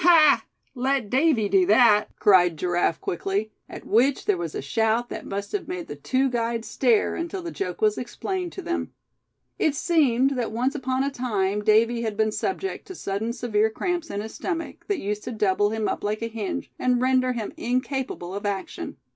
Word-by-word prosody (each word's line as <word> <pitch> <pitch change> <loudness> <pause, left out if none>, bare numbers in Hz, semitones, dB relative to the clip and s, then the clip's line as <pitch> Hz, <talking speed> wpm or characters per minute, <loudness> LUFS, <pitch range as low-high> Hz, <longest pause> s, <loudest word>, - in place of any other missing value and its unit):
"Ha! 330 -3 +6 0.3
let 260 -3 0
Davy 265 -6 +3
do 195 -2 +4
that!" 210 0 +6
cried 180 -5 +5
Giraffe, 175 -1 0
quickly; 195 +4 -2 0.2
at - - -9
which 255 +5 +2
there 205 - +3
was 170 -3 -5
a - - -2
shout 225 - +1
that - - -6
must 200 +1 -4
have 415 - -3
made 360 -2 -4
the - - -7
two 265 +1 +1
guides 235 -2 -2
stare, 240 -5 +2
until 340 +2 -4
the 340 - -5
joke 395 +4 -4
was 425 -1 +3
explained 370 -3 -4
to 380 - -7
them. 345 +1 -2 0.7
It 300 -3 +2
seemed 275 -6 +3
that 245 -5 -2
once 250 +5 0
upon 260 -2 -1
a 280 - -1
time 210 -6 -1
Davy 225 +2 +3
had 220 -3 -3
been 215 0 +2
subject 385 - -3
to 375 - -8
sudden 210 -3 -3
severe 220 -3 +1
cramps 345 +8 -2
in 200 - -3
his 220 +1 -7
stomach, 330 -3 -4
that 405 - 0
used 210 -5 -3
to - - -4
double 205 -2 +2
him 220 0 -1
up - - -3
like 215 +2 -2
a - - -1
hinge, 225 +3 -4
and 250 -1 +2
render 255 0 +2
him 225 -4 -4
incapable 250 -6 -2
of 200 - -5
action. 200 -2 -4
235 Hz, 195 wpm, -25 LUFS, 210-275 Hz, 0.7 s, Ha